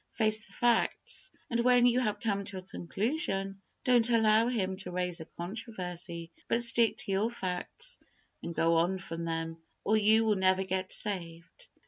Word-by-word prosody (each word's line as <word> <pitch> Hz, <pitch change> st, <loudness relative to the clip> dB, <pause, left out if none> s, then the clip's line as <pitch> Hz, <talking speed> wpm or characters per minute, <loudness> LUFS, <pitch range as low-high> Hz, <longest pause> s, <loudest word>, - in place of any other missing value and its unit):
Face 215 Hz, -1 st, +1 dB
the 195 Hz, -, -19 dB
facts, 240 Hz, +1 st, +1 dB, 0.2 s
and 235 Hz, -, +1 dB
when 245 Hz, 0 st, +5 dB
you 245 Hz, 0 st, +4 dB
have 210 Hz, -4 st, -1 dB
come 200 Hz, -2 st, -1 dB
to 195 Hz, -1 st, -5 dB
a 185 Hz, -, -7 dB
conclusion, 195 Hz, -, -2 dB, 0.2 s
don't 245 Hz, -2 st, +4 dB
allow 225 Hz, -1 st, +4 dB
him 195 Hz, -6 st, -1 dB
to 190 Hz, -1 st, -4 dB
raise 180 Hz, -1 st, -2 dB
a 160 Hz, -, -7 dB
controversy, 180 Hz, -3 st, -6 dB, 0.2 s
but 235 Hz, +1 st, +2 dB
stick 235 Hz, -1 st, +4 dB
to 245 Hz, -5 st, -3 dB
your 200 Hz, +4 st, +1 dB
facts, 235 Hz, -, -4 dB, 0.4 s
and 170 Hz, -, -6 dB
go 165 Hz, 0 st, +3 dB
on 175 Hz, +3 st, +2 dB
from 165 Hz, -2 st, -6 dB
them, 165 Hz, 0 st, -3 dB, 0.2 s
or 215 Hz, -, +2 dB
you 220 Hz, +1 st, +5 dB
will 215 Hz, -2 st, +2 dB
never 190 Hz, 0 st, +3 dB
get 190 Hz, 0 st, -2 dB
saved. 180 Hz, -, -3 dB
200 Hz, 170 wpm, -30 LUFS, 180-230 Hz, 0.4 s, when